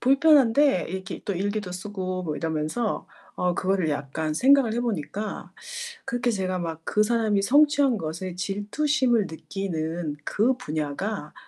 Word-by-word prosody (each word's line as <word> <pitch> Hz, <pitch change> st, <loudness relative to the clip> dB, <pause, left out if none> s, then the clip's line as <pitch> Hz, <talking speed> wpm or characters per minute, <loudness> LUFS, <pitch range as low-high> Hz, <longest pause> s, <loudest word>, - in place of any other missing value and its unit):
불편한데 275 Hz, -, +4 dB
이렇게 190 Hz, +1 st, -5 dB
또 200 Hz, -, -2 dB
일기도 200 Hz, +1 st, -2 dB
쓰고 185 Hz, -1 st, -4 dB
뭐 155 Hz, -4 st, -3 dB
이러면서 160 Hz, +9 st, -2 dB, 0.3 s
어 180 Hz, -1 st, 0 dB
그거를 185 Hz, -3 st, +1 dB
약간 145 Hz, +2 st, -2 dB
생각을 265 Hz, -, +5 dB
해 240 Hz, -, 0 dB
보니까 210 Hz, -2 st, -4 dB, 0.5 s
그렇게 245 Hz, -2 st, -1 dB
제가 185 Hz, -3 st, -1 dB
막 165 Hz, -2 st, -4 dB
그 210 Hz, +4 st, +2 dB
사람이 215 Hz, -2 st, +2 dB
성취한 285 Hz, +1 st, +4 dB
것에 170 Hz, +2 st, -5 dB
질투심을 220 Hz, +5 st, +1 dB
느끼는 160 Hz, -3 st, -4 dB
그 230 Hz, +5 st, +2 dB
분야가, 155 Hz, -, -3 dB
195 Hz, 300 characters per minute, -25 LUFS, 165-235 Hz, 0.5 s, 생각을